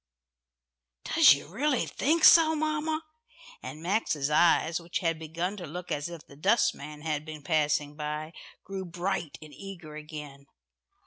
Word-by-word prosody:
"Does - - +6
you 140 - -8
really 255 - 0
think 315 +4 0
so, 320 -1 +8
mamma?" 310 +1 -1 0.6
and 155 +1 -8
Max's 170 -7 0
eyes, 165 +1 +3
which 170 0 -3
had 165 -4 -1
begun 170 +5 -3
to 175 -4 -7
look 175 +4 -7
as 145 +3 -2
if 170 -3 -10
the 140 - -16
dustman 150 -4 0
had 155 -1 -2
been 155 -2 -9
passing 150 -2 0
by, 150 +1 -5 0.3
grew 195 0 -5
bright 175 -2 -3
and 155 -1 -13
eager 170 -1 -10
again. 150 -3 -9
165 Hz, 145 wpm, -28 LUFS, 150-195 Hz, 0.6 s, so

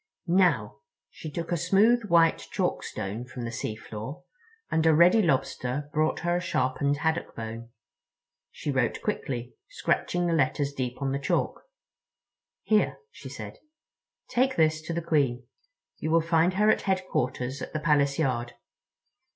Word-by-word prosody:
Now"—she 155 - -1
took 165 +3 -5
a 175 - +2
smooth 210 +7 +3
white 170 -4 +3
chalkstone 100 +5 -2
from 125 0 -8
the 115 - -4
seafloor, 115 +7 -6 0.5
and 160 - +2
a 160 - +6
ready 175 +7 +6
Lobster 140 -3 -1
brought 155 +1 +1
her 175 +1 +1
a - - -2
sharpened 140 -4 0
haddock 160 +3 -1
bone. 115 +1 -6 0.8
She 145 - -4
wrote 130 -4 0
quickly, 125 - -3 0.2
scratching 175 - 0
the 170 - +1
letters 145 -1 +1
deep 130 0 -4
on 135 - 0
the 140 - -1
chalk. 140 - -1 1.0
"Here," 215 -1 +2
she - - -10
said, - - -8 0.7
"take 260 +2 +1
this 155 -1 +2
to 170 - -2
the 170 0 -2
Queen. 135 -7 +1 0.6
You 155 - -2
will 165 +1 +4
find 165 +2 +2
her 210 +2 +5
at - - +1
Headquarters 140 -9 -1
at - - -6
the 155 - -2
Palace 145 -3 +2
yard. 120 -6 -1
150 Hz, 145 wpm, -27 LUFS, 125-175 Hz, 1.0 s, a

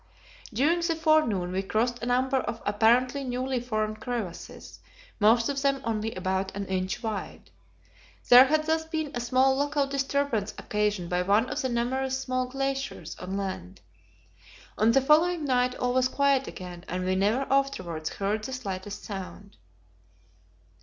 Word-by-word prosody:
During 290 +10 +2
the 335 -1 0
forenoon 310 - +2
we 190 +1 -1
crossed 235 +5 -1
a 240 - -3
number 260 +2 +2
of 230 -3 -3
apparently 240 +6 +2
newly 255 0 -2
formed 215 -3 -2
crevasses; 225 -7 -6 0.4
most 230 +2 +4
of 275 -1 -2
them 275 -1 +1
only 225 -1 -2
about 190 +1 -2
an 200 0 -3
inch 190 +3 -3
wide. 215 -3 -5 0.8
There 250 +1 +9
had 310 +3 +1
thus 320 0 +1
been 320 -2 -3
a 245 - -2
small 260 +2 +3
local 285 +1 +1
disturbance 275 -6 -1
occasioned 210 -4 -1
by 180 0 +1
one 205 +6 +2
of 300 - -2
the 260 - -1
numerous 260 +2 -1
small 255 -1 -2
glaciers 270 - -3
on 190 +2 -4
land. 185 - -5 0.9
On 220 +2 +3
the 270 - +4
following 315 +4 +3
night 250 -1 +1
all 250 0 -1
was 255 0 +3
quiet 275 0 +2
again, 175 -1 -8
and 180 +1 -3
we 185 0 +1
never 215 +8 +1
afterwards 175 - -1
heard 205 +2 -2
the 265 - -5
slightest 200 -4 -5
sound. 200 0 -8
245 Hz, 155 wpm, -27 LUFS, 200-270 Hz, 0.9 s, There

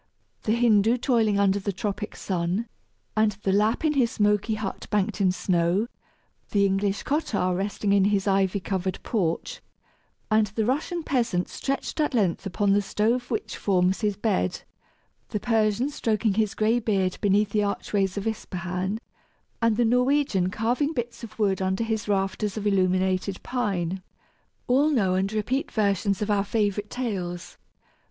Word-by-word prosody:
The 215 - +2
Hindoo 230 -1 +4
toiling 230 -5 +2
under 200 0 +3
the 200 +1 -2
tropic 205 +1 -4
sun, 185 +4 -2 0.5
and 215 -1 +3
the 195 - +2
Lapp 215 +8 +2
in 305 - +3
his 255 -5 +3
smoky 210 -2 +1
hut 210 -2 -5
banked 205 0 0
in 185 -2 +4
snow; 180 +2 +1 0.6
the 200 -1 +3
English 195 +1 0
cottar 255 - 0
resting 200 +1 -1
in 195 -1 +4
his 200 -1 +1
ivy 195 0 +2
covered 190 -1 -2
porch, 210 - -2 0.7
and 215 0 +4
the 215 +2 -2
Russian 315 - -1
peasant 235 -11 0
stretched 275 +3 -3
at 295 -3 +1
length 195 -4 +1
upon 195 +2 +1
the 205 - +3
stove 230 +5 0
which 220 -3 -3
forms 185 0 +1
his 205 -3 0
bed; 205 - 0 0.7
the 210 - -2
Persian 225 +4 +1
stroking 220 -5 0
his 215 0 0
gray 220 +3 +2
beard 195 -5 0
beneath 205 +1 +2
the 210 - +2
archways 200 -1 -1
of 200 - -3
Ispahan, 185 -2 -3 0.6
and 230 -2 +2
the 240 - +3
Norwegian 250 -5 +2
carving 245 - 0
bits 240 -3 -4
of 215 -2 -9
wood 195 -3 +1
under 190 +3 0
his 220 -2 -2
rafters 200 +1 -1
of 210 - -4
illuminated 185 -1 +1
pine 190 -7 -2 0.6
all 275 +5 +3
know 205 -11 +2
and 190 +2 0
repeat 255 +8 -1
versions 200 -1 +1
of 210 - -1
our 200 -1 +2
favorite 205 -1 -1
tales. 175 -8 -4
205 Hz, 155 wpm, -25 LUFS, 195-230 Hz, 0.7 s, Hindoo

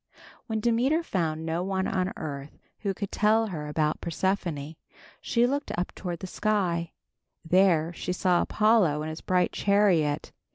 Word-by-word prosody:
When 220 -1 -2
Demeter 250 +8 +2
found 160 - -2
no 165 +1 -1
one 190 0 -1
on 185 0 0
earth 145 -2 -6 0.2
who 200 - -1
could 195 +1 -5
tell 220 +2 +3
her 150 -5 -5
about 150 0 0
Persephone, 170 -4 -2 0.5
she 235 0 +2
looked 280 +3 -1
up 175 - -2
toward 175 -4 -5
the - - -4
sky. 180 -4 -1 0.5
There 175 -2 +3
she 180 - -4
saw 180 -1 +2
Apollo 210 -9 +3
in 155 - -4
his 155 - -7
bright 180 -1 +1
chariot. 190 -8 +2
180 Hz, 155 wpm, -27 LUFS, 160-205 Hz, 0.5 s, tell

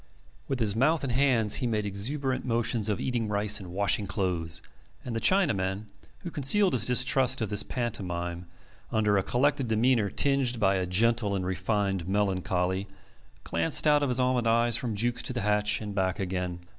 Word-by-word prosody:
With 135 - -2
his 105 -3 +2
mouth 150 +7 +2
and 130 -3 -2
hands 120 -6 +2
he 125 - 0
made 105 -2 -1
exuberant 130 +7 -2
motions 115 -2 -1
of 105 - -1
eating 120 -3 -2
rice 105 0 +1
and 95 -3 -9
washing 100 +1 +1
clothes; 90 -5 -2 0.5
and 120 - -4
the - - 0
Chinaman, 105 - +1 0.4
who 175 - -6
concealed 180 +8 +2
his 115 -3 +2
distrust 130 +1 +2
of 110 -3 -3
this 100 - +2
pantomime 90 -8 -4 0.4
under 105 -2 +2
a - - +1
collected 135 +5 0
demeanour 115 -1 +2
tinged 135 -3 +1
by 95 -2 +2
a 90 -1 -2
gentle 110 +2 +1
and 95 -2 -2
refined 95 -1 -1
melancholy, 95 -1 -1 0.6
glanced 85 - +1
out 150 -1 +4
of 145 - 0
his 125 0 +1
almond 125 -2 +1
eyes 115 0 +3
from 115 -2 -2
Jukes 120 +4 -1
to - - -4
the 120 - -3
hatch 105 +1 +1
and 105 -1 -5
back 95 -2 -1
again. 90 -2 -3
110 Hz, 180 wpm, -28 LUFS, 95-125 Hz, 0.6 s, out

